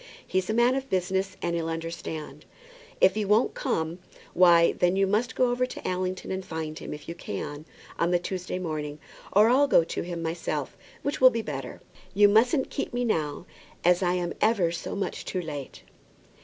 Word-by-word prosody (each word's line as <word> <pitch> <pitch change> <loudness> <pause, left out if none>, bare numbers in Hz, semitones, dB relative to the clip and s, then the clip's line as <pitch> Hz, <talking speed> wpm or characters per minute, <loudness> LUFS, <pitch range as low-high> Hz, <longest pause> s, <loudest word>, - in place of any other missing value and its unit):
He's 185 +1 -1
a - - +1
man 240 +2 +4
of 270 0 -3
business, 190 +1 -1
and 170 -1 0
he'll 165 -1 -2
understand. 165 -3 -6 0.6
If 190 - +6
he 215 +1 -1
won't 210 +4 +3
come, 160 +2 -2 0.3
why 170 -2 +6
then 180 +1 +1
you 195 0 +3
must 215 +5 0
go 250 -1 +3
over 250 +1 0
to - - -7
Allington, 185 0 -2
and 190 0 -3
find 160 -3 -5
him, - - -7
if 150 0 -8
you 170 - -4
can, 145 - -6 0.3
on 170 - +2
the 175 - +3
Tuesday 180 +1 -4
morning; 155 -4 -4 0.3
or 210 +2 +6
I'll 275 +4 +5
go 170 - +5
to - - -4
him 170 -1 -5
myself, 165 +1 -3 0.3
which 285 -1 -2
will 255 - +10
be 230 -2 -3
better. 135 -6 -6 0.3
You 205 +1 +7
mustn't 245 +6 +3
keep 275 - -3
me 245 0 0
now, 155 -7 -1 0.4
as 180 +1 +5
I 180 -1 +2
am 175 -1 -2
ever 205 -7 +3
so 170 - -5
much 200 - -3
too 185 - -3
late." 150 -5 -7
180 Hz, 195 wpm, -27 LUFS, 165-215 Hz, 0.6 s, will